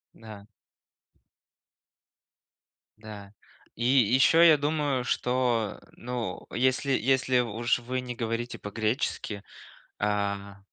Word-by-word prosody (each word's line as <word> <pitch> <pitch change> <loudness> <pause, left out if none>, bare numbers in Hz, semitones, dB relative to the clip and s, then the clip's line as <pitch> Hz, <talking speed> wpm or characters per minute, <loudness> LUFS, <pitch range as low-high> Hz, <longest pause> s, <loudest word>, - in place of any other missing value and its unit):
Да. 105 -3 -12 2.5
Да. 105 -2 -11 0.4
И 120 - -5
еще 130 +6 +5
я 155 - +6
думаю, 145 -3 -1
что, 125 -3 0
э, - - -21
ну, 120 -6 -5
если 130 +3 +1
если 130 0 +2
уж 120 +1 0
вы 125 +2 -3
не 125 -1 -6
говорите 115 0 -3
по-гречески, 105 -1 -3 0.6
а, 100 -1 -2
120 Hz, 95 wpm, -27 LUFS, 105-130 Hz, 2.5 s, я